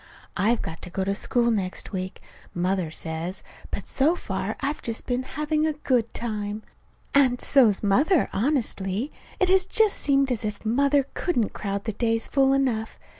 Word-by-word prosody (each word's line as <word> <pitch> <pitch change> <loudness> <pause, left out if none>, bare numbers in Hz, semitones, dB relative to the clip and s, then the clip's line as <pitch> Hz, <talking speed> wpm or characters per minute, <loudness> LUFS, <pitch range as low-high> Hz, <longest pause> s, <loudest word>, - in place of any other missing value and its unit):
I've 220 +5 +2
got 160 - -6
to 180 - -7
go 190 +2 -2
to 195 +1 0
school 235 +3 +1
next 190 -4 -2
week, 185 -1 -5 0.3
Mother 180 -1 0
says, 160 +3 -5 0.3
but - - -4
so 300 +6 +2
far - - -3
I've 285 +2 -2
just 230 -1 -4
been 245 0 0
having 300 +3 -1
a 310 - 0
good 250 -6 0
time. 215 -2 -4 0.5
And 260 -3 +4
so's 230 -8 +4
Mother. 275 - +3
Honestly, 230 -2 0 0.3
it 370 - +3
has 375 0 +4
just 435 -2 +3
seemed 275 -2 +2
as 235 -3 -1
if 210 0 -4
Mother 280 +4 +3
couldn't 245 - 0
crowd 200 -1 -3
the 220 - -3
days 225 +1 0
full 270 -1 +3
enough. 250 -5 0
235 Hz, 170 wpm, -25 LUFS, 200-280 Hz, 0.5 s, And